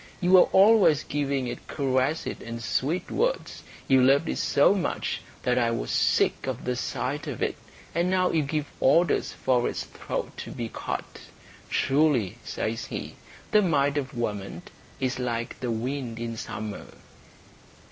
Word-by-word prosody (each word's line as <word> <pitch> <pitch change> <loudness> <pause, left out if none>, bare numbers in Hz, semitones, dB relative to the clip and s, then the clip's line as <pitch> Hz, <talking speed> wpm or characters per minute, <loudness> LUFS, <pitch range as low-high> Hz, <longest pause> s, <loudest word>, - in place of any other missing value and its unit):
You 180 -1 +1
were 185 -1 +7
always 195 -6 +6
giving 140 -2 -1
it 120 0 -6
caresses 135 +2 0
and 115 0 -6
sweet 160 +10 -1
words. - - -1 0.3
You 130 -1 +5
loved 135 +2 +4
it 65 - -2
so - - +4
much - - -2 0.2
that 125 0 +2
I 120 -1 +2
was 115 - -2
sick - - +2
of 130 -2 -4
the 125 0 0
sight 130 +3 -3
of - - -5
it, - - 0 0.4
and 170 +2 +1
now 185 -1 +2
you 160 - +2
give 150 +1 -2
orders 170 +6 +3
for 125 -2 +1
its - - -4
throat - - -5
to - - -6
be 115 -1 -5
cut. - - -5 0.5
Truly," 135 - +2
says 110 +1 -3
he, - - -6 0.4
"the 210 - +6
mind 145 -6 +2
of 135 -3 -6
woman 100 -6 -3 0.4
is 130 -1 -1
like 120 -2 -3
the 125 - -3
wind 120 +1 -3
in 115 0 -4
summer." 105 -1 -6
130 Hz, 155 wpm, -26 LUFS, 120-155 Hz, 0.5 s, were